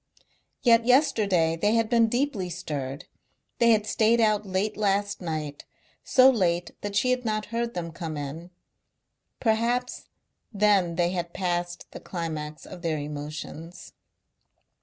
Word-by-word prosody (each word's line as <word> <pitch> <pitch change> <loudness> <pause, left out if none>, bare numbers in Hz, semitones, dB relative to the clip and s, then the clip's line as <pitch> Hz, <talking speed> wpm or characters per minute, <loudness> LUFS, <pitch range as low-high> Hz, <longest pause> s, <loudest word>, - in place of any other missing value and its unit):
Yet 230 -2 +5
yesterday 205 - +3
they 205 +7 +1
had 230 -1 +2
been 230 -1 +4
deeply 240 -6 -1
stirred. 145 -5 -5 0.5
They 235 - +5
had 215 -2 +4
stayed 225 +2 +2
out 215 -2 +2
late 195 +3 -1
last 200 -1 0
night, 155 -4 -4 0.4
so 255 0 +6
late 175 -7 0
that 205 0 -5
she 250 +4 +2
had 255 0 0
not 215 -2 -1
heard 235 0 -2
them 170 -2 -4
come 160 -2 -5
in. 145 +5 -6 0.9
Perhaps 235 +2 0 0.5
then 200 -5 +2
they 175 0 +1
had 175 -2 -4
passed 175 -1 -2
the - - -8
climax 155 -3 -5
of 180 - -10
their 165 -3 -1
emotions. 150 +3 -7
190 Hz, 140 wpm, -26 LUFS, 165-225 Hz, 0.9 s, so